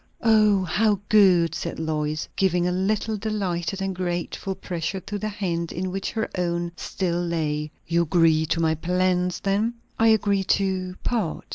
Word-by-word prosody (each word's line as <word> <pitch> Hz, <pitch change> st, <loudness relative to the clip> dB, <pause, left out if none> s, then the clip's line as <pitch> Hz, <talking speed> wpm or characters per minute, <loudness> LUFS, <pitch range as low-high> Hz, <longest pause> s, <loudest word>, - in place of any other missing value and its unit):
"Oh! 215 Hz, -3 st, +4 dB
how 205 Hz, +3 st, +2 dB
good!" 185 Hz, -6 st, +5 dB
said -, -, -4 dB
Lois, 155 Hz, -1 st, -2 dB
giving 180 Hz, -2 st, +2 dB
a -, -, +1 dB
little 210 Hz, +4 st, 0 dB
delighted 195 Hz, -3 st, -2 dB
and 195 Hz, 0 st, -1 dB
grateful 180 Hz, +1 st, -3 dB
pressure 180 Hz, 0 st, -4 dB
to 205 Hz, +2 st, -5 dB
the 215 Hz, -, -2 dB
hand 175 Hz, -5 st, -3 dB
in 185 Hz, +2 st, -3 dB
which 195 Hz, +1 st, -3 dB
her 220 Hz, -1 st, -1 dB
own 175 Hz, -1 st, -1 dB
still 175 Hz, -1 st, -2 dB
lay. 155 Hz, -3 st, -1 dB, 0.2 s
"You 170 Hz, +1 st, +2 dB
agree 160 Hz, -1 st, +3 dB
to 165 Hz, +2 st, 0 dB
my 160 Hz, -1 st, +2 dB
plans, 180 Hz, +2 st, 0 dB
then?" 210 Hz, +4 st, 0 dB, 0.2 s
"I 225 Hz, -, +5 dB
agree 205 Hz, -3 st, +3 dB
to 185 Hz, -1 st, 0 dB
part. 220 Hz, -10 st, -1 dB
185 Hz, 160 wpm, -24 LUFS, 170-200 Hz, 0.2 s, good